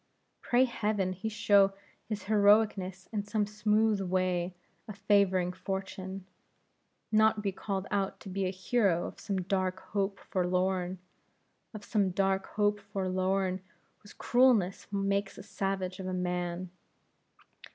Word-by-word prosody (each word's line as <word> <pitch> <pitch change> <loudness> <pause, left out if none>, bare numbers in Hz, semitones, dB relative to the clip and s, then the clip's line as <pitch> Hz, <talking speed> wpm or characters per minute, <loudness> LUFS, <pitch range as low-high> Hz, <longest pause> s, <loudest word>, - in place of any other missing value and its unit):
Pray 245 +1 +3
heaven 210 -6 -1
he 200 +5 -4
show 205 -3 +4 0.4
his 210 -3 -3
heroicness 205 -3 +3
in 210 -2 -2
some 210 0 0
smooth 210 0 +1
way 185 -1 0 0.3
of 210 -2 -8
favoring 195 -3 +2
fortune, 190 0 -5 0.9
not 215 -1 +4
be 200 - 0
called 195 0 -3
out 200 -1 -1
to - - -11
be 190 0 -1
a - - 0
hero 185 -1 +1
of - - -8
some 190 -2 -2
dark 185 0 -1
hope 200 -1 0
forlorn; 185 0 0 0.7
of 210 -2 -9
some 205 -4 +1
dark 195 +1 0
hope 205 0 +1
forlorn, 185 -1 0 0.4
whose 210 - -15
cruelness 240 -7 +3
makes 200 0 -1
a - - -9
savage 195 -2 -3
of 185 - -5
a 185 - -2
man. 180 0 -2
195 Hz, 130 wpm, -30 LUFS, 185-210 Hz, 0.9 s, show